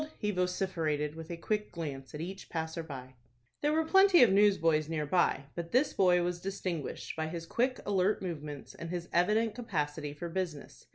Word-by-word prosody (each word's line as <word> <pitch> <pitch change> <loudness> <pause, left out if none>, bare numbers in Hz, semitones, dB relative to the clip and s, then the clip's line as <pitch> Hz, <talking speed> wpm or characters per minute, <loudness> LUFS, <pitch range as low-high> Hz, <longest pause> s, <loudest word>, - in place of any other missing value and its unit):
he 210 -1 -1
vociferated, 175 -5 -1
with 160 0 -9
a 170 - -4
quick 210 +4 -2
glance 140 -5 -6
at 150 - -5
each 190 +3 -7
passer 160 0 -3
by. 130 -5 -8 0.5
There 295 - +2
were 320 +1 +2
plenty 385 -2 +7
of 225 - +5
newsboys 165 -7 +4
near 155 -2 -1
by, 150 -3 +2
but 170 -1 -5
this 265 +4 +3
boy 180 -2 +4
was 175 0 -2
distinguished 185 -5 -4
by 160 0 -2
his 165 +1 -5
quick, 255 +8 0
alert 200 0 +2
movements, 150 -6 -6
and 170 - -7
his 175 -1 -4
evident 210 +5 +3
capacity 150 -10 -3
for 145 +4 -6
business. 170 -4 -5
175 Hz, 180 wpm, -31 LUFS, 155-200 Hz, 0.5 s, plenty